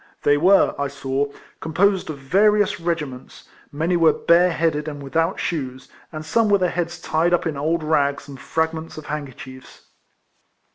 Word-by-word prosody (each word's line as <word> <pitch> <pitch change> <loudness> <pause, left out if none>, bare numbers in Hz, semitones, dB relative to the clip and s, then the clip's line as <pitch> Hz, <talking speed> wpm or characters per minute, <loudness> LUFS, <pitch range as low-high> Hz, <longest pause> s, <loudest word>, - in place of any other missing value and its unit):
They 145 - +4
were, 185 +7 +4
I 140 - 0
saw, 140 0 -2 0.3
composed 185 +4 +1
of 155 - -5
various 205 +9 +2
regiments; 150 -7 -5 0.2
many 165 +5 0
were 165 -2 +4
bare 175 +2 +4
headed, 160 -2 -1
and 145 -2 -6
without 165 +6 -1
shoes; 130 -6 -4 0.2
and 155 -1 -7
some 225 +6 +2
with 200 -2 +3
their 180 - +1
heads 170 0 -3
tied 170 +1 +1
up - - -4
in 160 -3 -2
old 160 +3 -1
rags 145 -2 0
and 140 -2 -10
fragments 160 +3 -3
of 155 - -8
handkerchiefs. 135 -3 -8
160 Hz, 160 wpm, -22 LUFS, 140-175 Hz, 0.3 s, They